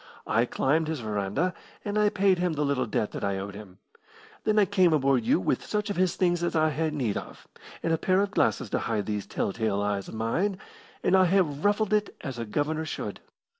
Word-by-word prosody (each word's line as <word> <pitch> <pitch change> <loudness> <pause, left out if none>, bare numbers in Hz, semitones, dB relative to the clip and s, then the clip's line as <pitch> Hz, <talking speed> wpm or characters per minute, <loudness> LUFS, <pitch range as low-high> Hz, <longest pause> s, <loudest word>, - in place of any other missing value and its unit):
I 115 - +2
climbed 155 +6 +1
his 160 -2 -2
verandah, 110 - -1 0.3
and 205 0 -2
I 210 0 +4
paid 190 -2 +2
him 180 -2 +1
the 150 -1 0
little 135 -3 0
debt 105 0 -1
that - - -6
I 100 -1 0
owed 100 +1 -5
him. 100 -3 -11 0.7
Then 215 0 +2
I 210 - +6
came 185 -3 +3
aboard 135 -4 +3
you - - +3
with 110 +7 0
such 210 0 -2
of - - -3
his 185 0 +1
things 175 -2 +1
as 175 - -1
I 155 0 +3
had 155 +2 -1
need 120 -8 -1
of, - - -9 0.4
and 165 - +1
a 160 - +1
pair 185 +3 +3
of 200 0 -1
glasses 125 - +1
to - - +1
hide 105 -3 -1
these 105 -2 -3
tell - - -2
tale 110 -3 0
eyes 100 -1 -1
of - - -8
mine, 170 - 0 0.5
and 180 - +4
I 185 -1 +6
have 170 -6 +1
ruffled 205 +1 +2
it 210 -1 +1
as 135 -5 -5
a 115 - -3
governor 150 +7 -1
should. 155 - -5
155 Hz, 230 wpm, -27 LUFS, 110-185 Hz, 0.7 s, I